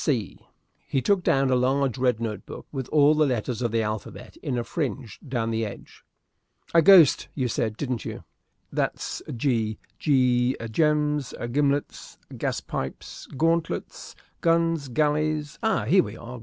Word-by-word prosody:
Here 120 Hz, -, -1 dB, 0.5 s
he 135 Hz, -, 0 dB
took 185 Hz, +9 st, +2 dB
down 135 Hz, -5 st, +2 dB
a -, -, +4 dB
large 130 Hz, 0 st, +1 dB
red 125 Hz, -3 st, +2 dB
note 110 Hz, -4 st, -4 dB
book, -, -, -9 dB
with 135 Hz, -3 st, -4 dB
all 150 Hz, 0 st, +5 dB
the 155 Hz, -1 st, +3 dB
letters 125 Hz, -1 st, -2 dB
of 120 Hz, -2 st, 0 dB
the 115 Hz, -1 st, +1 dB
alphabet 105 Hz, -1 st, -6 dB
in 125 Hz, -, -3 dB
a 120 Hz, -, -1 dB
fringe 130 Hz, -, -4 dB
down 120 Hz, -5 st, -3 dB
the 115 Hz, 0 st, -1 dB
edge. 105 Hz, -2 st, -9 dB, 0.7 s
"A 165 Hz, -, +7 dB
ghost 170 Hz, -4 st, +7 dB
you 130 Hz, -3 st, 0 dB
said, 110 Hz, -2 st, -2 dB
didn't 125 Hz, -5 st, -3 dB
you. -, -, -7 dB, 0.5 s
That's -, -, -2 dB, 0.2 s
G. 115 Hz, -4 st, 0 dB, 0.2 s
G 125 Hz, -3 st, +2 dB, 0.2 s
gems 150 Hz, 0 st, +1 dB, 0.2 s
gimlets 145 Hz, +1 st, -1 dB, 0.2 s
gaspipes 65 Hz, 0 st, -5 dB
gauntlets 165 Hz, +2 st, -1 dB, 0.3 s
guns 165 Hz, -3 st, +2 dB
galleys. 150 Hz, +3 st, 0 dB
Ah, 220 Hz, -, +1 dB
here 185 Hz, -, +5 dB
we -, -, -8 dB
are! 120 Hz, +2 st, -9 dB
135 Hz, 150 wpm, -25 LUFS, 115-150 Hz, 0.7 s, A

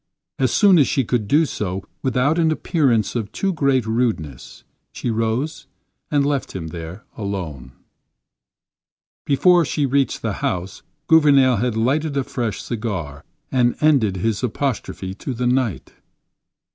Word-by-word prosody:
As 130 Hz, -3 st, +2 dB
soon 195 Hz, -5 st, +5 dB
as 140 Hz, -, +4 dB
she 135 Hz, -, +1 dB
could 115 Hz, -2 st, -1 dB
do 155 Hz, +8 st, +4 dB
so 95 Hz, -8 st, -4 dB, 0.2 s
without 135 Hz, +5 st, +1 dB
an 160 Hz, -1 st, +3 dB
appearance 135 Hz, -, +1 dB
of 110 Hz, -4 st, -3 dB
too 195 Hz, -1 st, -1 dB
great 135 Hz, -6 st, +1 dB
rudeness, 110 Hz, -, -2 dB, 0.3 s
she 120 Hz, -, -3 dB
rose 115 Hz, +7 st, -2 dB, 0.4 s
and 145 Hz, -2 st, +2 dB
left 140 Hz, -2 st, -1 dB
him 80 Hz, -4 st, -5 dB
there 85 Hz, +6 st, -8 dB
alone. 85 Hz, -, -5 dB, 1.5 s
Before 175 Hz, +5 st, +4 dB
she 145 Hz, -1 st, -1 dB
reached 135 Hz, 0 st, 0 dB
the -, -, -1 dB
house, 90 Hz, +1 st, -3 dB, 0.2 s
Gouvernail 140 Hz, -6 st, +5 dB
had 115 Hz, +1 st, -1 dB
lighted 140 Hz, +5 st, 0 dB
a 135 Hz, -, +1 dB
fresh 120 Hz, -5 st, -3 dB
cigar 95 Hz, -, -4 dB, 0.3 s
and 125 Hz, -2 st, +2 dB
ended 130 Hz, -11 st, +3 dB
his 110 Hz, +2 st, -1 dB
apostrophe 120 Hz, -6 st, -3 dB
to 125 Hz, +6 st, -6 dB
the 125 Hz, +2 st, -2 dB
night. 125 Hz, -6 st, 0 dB
125 Hz, 140 wpm, -21 LUFS, 100-140 Hz, 1.5 s, soon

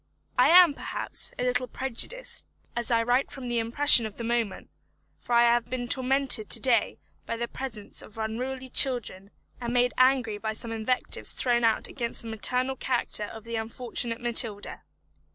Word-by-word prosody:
I -, -, +4 dB
am, 350 Hz, -3 st, +7 dB
perhaps, -, -, -4 dB
a -, -, -2 dB
little 250 Hz, 0 st, 0 dB
prejudiced, 265 Hz, -, -3 dB, 0.3 s
as 235 Hz, 0 st, -3 dB
I 230 Hz, -1 st, +2 dB
write 245 Hz, +3 st, +1 dB
from 260 Hz, -3 st, -8 dB
the 240 Hz, -1 st, 0 dB
impression 235 Hz, 0 st, +5 dB
of 210 Hz, -, -12 dB
the 235 Hz, -, -7 dB
moment; 230 Hz, -4 st, -2 dB, 0.5 s
for 245 Hz, -, -5 dB
I 235 Hz, 0 st, +6 dB
have 235 Hz, 0 st, +2 dB
been 250 Hz, -1 st, -4 dB
tormented 260 Hz, -3 st, +1 dB
to -, -, +6 dB
day 240 Hz, -5 st, +2 dB, 0.3 s
by 230 Hz, -, -3 dB
the 235 Hz, +1 st, -3 dB
presence 230 Hz, -5 st, -6 dB
of 215 Hz, -, -15 dB
unruly 255 Hz, +4 st, -4 dB
children, 235 Hz, -8 st, +1 dB, 0.3 s
and 240 Hz, -1 st, -3 dB
made 245 Hz, 0 st, +2 dB
angry 255 Hz, -5 st, +2 dB
by 220 Hz, 0 st, -3 dB
some 225 Hz, +1 st, -4 dB
invectives 225 Hz, +3 st, -2 dB
thrown 240 Hz, -2 st, +1 dB
out 225 Hz, -1 st, +1 dB
against 235 Hz, -2 st, -4 dB
the 230 Hz, -, -7 dB
maternal 250 Hz, +5 st, +1 dB
character 245 Hz, -5 st, 0 dB
of 220 Hz, +1 st, -10 dB
the 230 Hz, 0 st, -4 dB
unfortunate 230 Hz, +1 st, -2 dB
Matilda. 230 Hz, -3 st, 0 dB
240 Hz, 170 wpm, -26 LUFS, 225-255 Hz, 0.5 s, am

